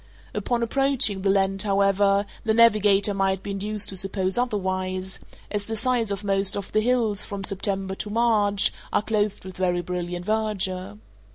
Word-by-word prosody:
Upon 235 +3 -1
approaching 255 -5 +1
the 195 - 0
land, 195 0 +1
however, 200 0 +2 0.2
the 220 -1 +1
navigator 210 -3 +4
might 195 -1 -1
be 200 - -5
induced 205 +1 0
to 195 - +1
suppose 190 0 0
otherwise, 190 -5 -2 0.3
as 205 -1 -2
the 225 - -3
sides 235 -1 +1
of 200 0 -4
most 195 -1 +3
of 200 - -6
the 215 - +2
hills, 230 -4 +1
from 200 -1 -6
September 195 0 0
to 210 +2 -5
March, 210 -3 +2 0.2
are - - +1
clothed 210 -3 -2
with 185 -1 -9
very 180 -1 0
brilliant 175 0 -5
verdure. 195 - -2
200 Hz, 165 wpm, -24 LUFS, 190-215 Hz, 0.3 s, navigator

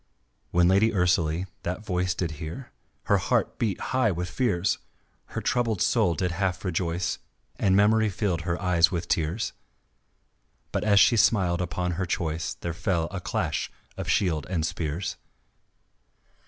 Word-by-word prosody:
When 85 0 +4
Lady 100 +5 +4
Ursalie 90 -3 +1 0.2
that 90 +5 -4
voice 90 -2 0
Did 85 -3 -2
hear, 85 +12 -7 0.3
her - - +3
heart - - 0
beat 105 -6 0
high 130 -4 +3
with 90 -1 -3
fears, 100 -6 +1 0.5
Her - - -5
troubled 115 -5 0
soul 105 -4 +2
did 90 +3 -1
half 90 +1 -2
rejoice 85 -1 -1 0.4
And 95 -2 +3
memory 110 +2 +4
filled 95 -4 -1
her 85 +1 -2
eyes 90 -3 +4
with 85 -2 -3
tears; 85 +8 -1 1.2
But - - -1
as 105 -1 +5
she 115 - +5
smiled 90 -6 +3
upon 90 0 -2
her 95 - -1
choice 85 0 -2
There 85 - -4
fell 85 -1 -1
a 95 -2 -4
clash - - -2 0.2
of - - -5
shields 80 -6 +1
and 85 -4 0
spears. 80 +3 -3
90 Hz, 150 wpm, -26 LUFS, 85-100 Hz, 1.2 s, as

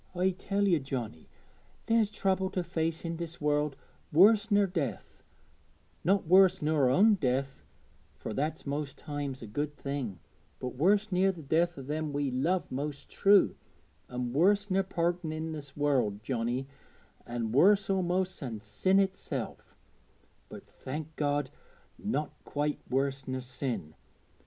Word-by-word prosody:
I 185 +2 +2
tell 200 +2 -1
ye, 175 -4 +4
Johnnie, 125 - -5 0.6
there's 225 -2 +3
trouble 190 -2 0
to 180 - +1
face 165 -1 -2
i' - - -2
this 170 0 -5
world 150 -1 +1 0.4
worse 205 +6 +6
ner 205 -1 +4
death, 155 - -4 0.8
not 195 +3 +2
worse 185 +2 +6
ner 155 -2 0
our 140 -5 +4
own 205 - +5
death, 135 -5 -1 0.5
fur 110 - -6
that's 155 +6 -2
most 140 -1 -3
times 145 -4 -5
a - - -5
good 145 +7 -3
thing, 135 -11 -4 0.4
but 125 - -4
worse 200 +11 +2
ner 185 +2 +3
the 170 -4 -10
death 170 +4 +1
o' 135 - -6
them 150 +2 -3
we 140 -2 0
love 170 +9 0
most 140 +2 -5
true 200 0 +5 0.5
an' 125 -1 -3
worse 200 +6 +3
ner 190 +1 +3
parting 175 -3 -1
i' 160 +1 -4
this 145 -3 -8
world, 125 -8 +1
Johnnie, 120 +2 -2 0.6
an' 120 -2 -3
worse 195 - +5
a'most 185 -1 0
than 120 -6 -5
sin 190 - +1
itself; 195 -1 -3 0.7
but, - - -10
thank 155 +3 -7
God, 145 -2 0 0.5
not 200 -8 -2
quite 145 0 -2
worse 135 +1 -1
ner 130 0 -2
sin. 125 - -4
150 Hz, 145 wpm, -30 LUFS, 135-185 Hz, 0.8 s, worse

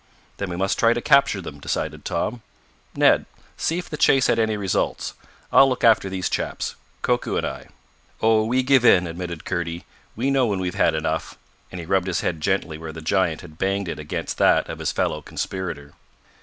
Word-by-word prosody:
"Then 100 - -3
we 85 - -4
must 95 +2 -1
try 115 0 +5
to 120 - -2
capture 140 -7 +3
them," 75 -5 -9
decided - - -3
Tom. 120 +1 -2 0.5
"Ned, - - +4 0.3
see 165 - -1
if 180 - -5
the 150 - -6
chase 135 -2 +4
had 115 - +2
any 110 -1 +1
results. 95 -3 -1 0.4
I'll 135 - +7
look 130 - -3
after 110 -4 +5
these 95 -1 -2
chaps - - -3 0.3
Koku - - 0
and - - 0
I." - - -6 0.5
"Oh, 110 -1 +3
we 125 +4 +1
give 135 -1 +4
in," 90 -7 +6
admitted 85 -1 -6
Kurdy. 85 -1 -3 0.3
"We 130 +5 0
know 135 -3 +3
when 100 -3 0
we've 90 -1 -2
had - - +2
enough," - - -2 0.3
and 90 - -7
he 85 - -6
rubbed 95 +1 +1
his 90 - -1
head 80 -3 -2
gently 85 -4 -1
where 80 -1 -6
the 80 +1 -9
giant 85 0 +1
had 80 -3 -14
banged 95 0 0
it - - -5
against 75 -1 -4
that - - +4
of - - -6
his - - -1
fellow 75 - -1
conspirator. 80 -4 -5
95 Hz, 200 wpm, -23 LUFS, 85-115 Hz, 0.5 s, I'll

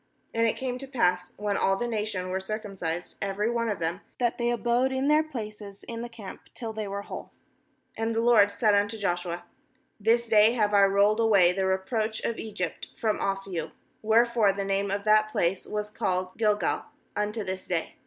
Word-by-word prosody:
8And 230 0 +3
it - - -3
came 255 -1 -3
to 275 - -7
pass, 180 -9 0
when 205 -1 -1
all 195 0 +2
the 240 - -2
nation 210 -5 -2
were 190 +1 -1
circumcised^ 190 -4 -4
every 200 +3 0
one 230 -1 0
of 210 - -1
them, 170 +3 -2 0.2
that 240 -1 0
they 235 0 +1
abode 240 +2 +1
in 265 +2 0
their 305 +1 +5
places 215 -9 -7
in 230 0 -6
the 240 - -5
camp, 225 -5 -11
till 225 -2 -5
they 215 -1 -4
were 200 0 -4
whole. - - -8 0.7
9And 225 0 0
the 225 - +2
LORD 230 -4 +6
said 205 +1 +2
unto 205 +2 +1
Joshua: 175 -3 -2 0.6
'This 230 +3 +2
day 215 +1 +6
have 210 -3 +1
I 200 -1 +7
rolled 200 +2 +3
away 200 -6 +5
the 190 +1 0
reproach 215 +4 -1
of 230 - -2
Egypt 215 -2 -4
from 220 -2 0
off 195 0 -1
you/ 165 -5 -4 0.3
Wherefore 225 -1 +4
the 200 0 -3
name 195 +1 0
of 200 +1 -2
that 215 0 +4
place 180 -1 0
was 210 0 -3
called 185 -4 -1
bGilgal, 210 -4 +1 0.3
unto 210 +1 -1
this 190 -1 -5
day. 170 -3 -2
210 Hz, 195 wpm, -27 LUFS, 195-230 Hz, 0.7 s, I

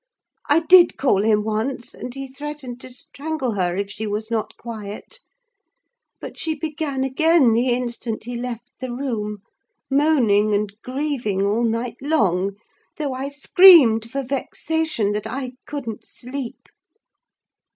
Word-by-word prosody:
I 300 +3 +5
did 355 +1 +6
call 230 -8 +2
him 210 0 +2
once, 220 +4 -3
and 250 - -7
he 270 +1 -6
threatened 270 -2 -7
to - - -8
strangle 275 +1 -4
her 180 -4 -1
if 200 +1 -3
she 210 +1 -5
was 215 +2 -4
not 225 -2 -2
quiet; 220 - -8 1.0
but - - -9
she 320 -1 -1
began 300 -3 -3
again 270 -1 +4
the 240 +3 +2
instant 240 -2 -2
he 245 +2 -6
left 245 0 -6
the 255 -1 -5
room, 215 -6 -4 0.5
moaning 240 -8 +3
and 205 -1 -1
grieving 255 -7 -2
all 210 +4 +1
night 230 +1 -1
long, 200 - +1 0.4
though 290 -4 -2
I 265 +2 -4
screamed 285 - +7
for 275 +3 -3
vexation 275 -2 -1
that 210 0 -3
I 260 -1 -4 0.2
couldn't 240 -7 -6
sleep." 255 0 -7
245 Hz, 140 wpm, -22 LUFS, 220-280 Hz, 1.0 s, screamed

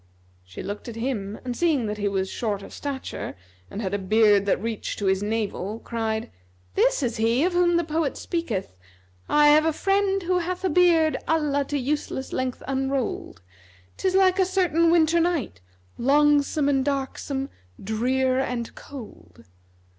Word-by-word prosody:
She 90 0 -9
looked 205 +4 -6
at 230 - -8
him 225 -4 -3
and 245 -1 -3
seeing 310 -7 +1
that 210 0 -4
he 205 - 0
was 190 -1 -1
short 205 -1 -3
of - - -11
stature[FN#271] 280 -2 -5 0.3
and 210 - -5
had 190 0 -3
a 205 - 0
beard 205 0 +4
that - - +2
reached 225 +1 -4
to 205 - -3
his 190 0 +2
navel, 210 -1 -2
cried, 225 -1 -3 0.4
"This 275 - +2
is 235 -2 -1
he 230 +5 +2
of 360 +1 +1
whom 350 -1 +3
the 340 - +1
poet 315 -2 -1
speaketh, 230 - -3 0.5
'I 295 0 +5
have 305 +1 +5
a 320 - +3
friend 390 +3 +1
who 360 +1 +1
hath 360 +2 -4
a 370 - +1
beard 330 -2 +4
* - - -27
Allah 295 -3 +1
to 290 - -2
useless 270 -1 -3
length 255 -1 -2
unroll'd: 270 - -2 0.5
'Tis 375 -1 0
like 380 0 +4
a - - +6
certain[FN#272] 360 -3 +2
winter 335 0 +4
night, 330 - -1 0.2
* 90 - -31
Longsome 290 +2 +3
and 270 -2 +2
darksome, 275 0 -2 0.3
drear 255 +5 +1
and 245 -3 -3
cold.'" 235 - -12
270 Hz, 170 wpm, -25 LUFS, 220-320 Hz, 0.5 s, a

